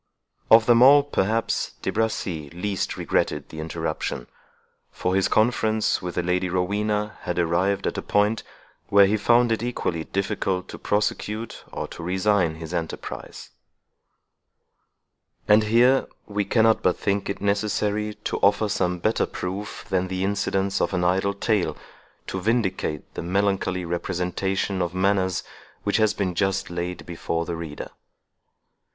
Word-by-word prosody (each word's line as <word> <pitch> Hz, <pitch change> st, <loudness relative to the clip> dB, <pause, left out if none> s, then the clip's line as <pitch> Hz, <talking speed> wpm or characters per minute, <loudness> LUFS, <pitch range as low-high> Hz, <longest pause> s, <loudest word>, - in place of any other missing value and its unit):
Of 110 Hz, 0 st, +8 dB
them 120 Hz, 0 st, +5 dB
all, 140 Hz, +3 st, +8 dB
perhaps, 115 Hz, -5 st, 0 dB
De -, -, 0 dB
Bracy 95 Hz, -9 st, -2 dB
least 90 Hz, +3 st, -3 dB
regretted -, -, -1 dB
the 80 Hz, -, -8 dB
interruption; 80 Hz, -5 st, -3 dB, 0.6 s
for 90 Hz, -, -2 dB
his 95 Hz, 0 st, +3 dB
conference 110 Hz, -1 st, +2 dB
with 90 Hz, -1 st, -5 dB
the 90 Hz, -, 0 dB
Lady 90 Hz, +1 st, 0 dB
Rowena 105 Hz, +3 st, -1 dB
had 90 Hz, -, -3 dB
arrived 90 Hz, +3 st, +1 dB
at -, -, -1 dB
a -, -, -3 dB
point, 105 Hz, +2 st, +1 dB, 0.5 s
where 100 Hz, 0 st, +6 dB
he 100 Hz, +2 st, +2 dB
found 120 Hz, +3 st, +3 dB
it 110 Hz, -, +1 dB
equally 90 Hz, -9 st, -2 dB
difficult 95 Hz, -2 st, -2 dB
to -, -, -8 dB
prosecute 105 Hz, +2 st, -2 dB
or -, -, -4 dB
to -, -, -9 dB
resign 90 Hz, -1 st, +1 dB
his 80 Hz, +1 st, -8 dB
enterprise. 85 Hz, -2 st, -6 dB, 2.0 s
And 105 Hz, +1 st, +5 dB
here 120 Hz, +5 st, +4 dB, 0.2 s
we 105 Hz, -1 st, -2 dB
cannot 110 Hz, 0 st, +3 dB
but 90 Hz, -, +2 dB
think 100 Hz, 0 st, -1 dB
it 100 Hz, -, -3 dB
necessary 105 Hz, +1 st, 0 dB
to -, -, -2 dB
offer 105 Hz, +1 st, +3 dB
some 90 Hz, -2 st, 0 dB
better 110 Hz, +6 st, +1 dB
proof 95 Hz, +3 st, -5 dB
than 95 Hz, -2 st, 0 dB
the 95 Hz, 0 st, -2 dB
incidents 100 Hz, -1 st, 0 dB
of -, -, 0 dB
an 90 Hz, -, 0 dB
idle 95 Hz, +3 st, +1 dB
tale, 100 Hz, -7 st, 0 dB, 0.5 s
to 95 Hz, -, -4 dB
vindicate 95 Hz, -8 st, -1 dB
the -, -, -4 dB
melancholy 95 Hz, 0 st, 0 dB
representation 90 Hz, +2 st, -1 dB
of 90 Hz, 0 st, -2 dB
manners 95 Hz, -1 st, +1 dB, 0.4 s
which 100 Hz, -, +1 dB
has 110 Hz, -2 st, +2 dB
been 95 Hz, -3 st, -1 dB
just 95 Hz, +1 st, 0 dB
laid 85 Hz, +1 st, -4 dB
before 85 Hz, -1 st, -3 dB
the 85 Hz, -, -3 dB
reader. 80 Hz, -3 st, -7 dB
95 Hz, 145 wpm, -24 LUFS, 90-105 Hz, 2.0 s, Of